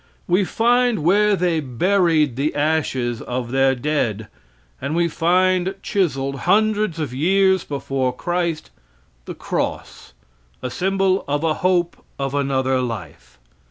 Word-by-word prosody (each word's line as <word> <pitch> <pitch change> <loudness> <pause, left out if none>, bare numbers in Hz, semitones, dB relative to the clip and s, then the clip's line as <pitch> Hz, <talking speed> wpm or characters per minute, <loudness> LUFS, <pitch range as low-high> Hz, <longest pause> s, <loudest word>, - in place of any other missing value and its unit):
We 180 +3 +2
find 240 -3 +2
where 205 +4 +4
they 175 -3 0
buried 155 +1 +1
the 140 +4 -1
ashes 145 -6 -1
of 125 -1 -4
their 135 0 +3
dead, 120 -6 -2 0.5
and 140 +4 -2
we 170 0 +2
find 185 +3 +1
chiseled, 140 -8 -1
hundreds 215 -4 +2
of 145 -6 -3
years 190 +5 +2
before 135 -2 -2
Christ, 170 +3 -3 0.5
the - - -7
cross, - - -4 0.5
a 125 - -3
symbol 190 +2 +1
of 145 +2 -1
a 160 -1 +2
hope 180 -1 0
of 135 -1 -3
another 135 -2 0
life. 85 - -7
155 Hz, 125 wpm, -21 LUFS, 135-185 Hz, 0.5 s, where